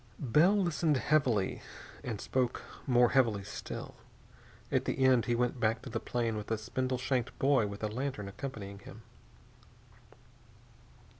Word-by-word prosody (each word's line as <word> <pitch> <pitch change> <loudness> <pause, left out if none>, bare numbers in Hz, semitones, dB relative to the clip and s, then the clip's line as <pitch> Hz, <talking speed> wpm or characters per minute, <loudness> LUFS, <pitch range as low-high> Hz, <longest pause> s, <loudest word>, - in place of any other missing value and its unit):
Bell 155 - +4
listened 170 -5 +2
heavily 130 -9 +1 0.4
and 110 -5 -4
spoke 125 +1 -1 0.2
more 125 -2 +5
heavily 115 -7 +2
still. 105 - -7 0.8
At - - +1
the - - -1
end 130 -3 +5
he 120 - +1
went 125 +1 0
back 110 +1 +1
to - - -8
the - - -1
plane 115 -2 -1
with 105 - -6
a 110 - +1
spindle 130 +4 -2
shanked 130 -1 -1
boy 135 -5 +3
with 100 +1 -7
a - - +2
lantern 120 -2 -3
accompanying 100 -2 -7
him. 110 +3 -12
120 Hz, 145 wpm, -32 LUFS, 110-130 Hz, 0.8 s, more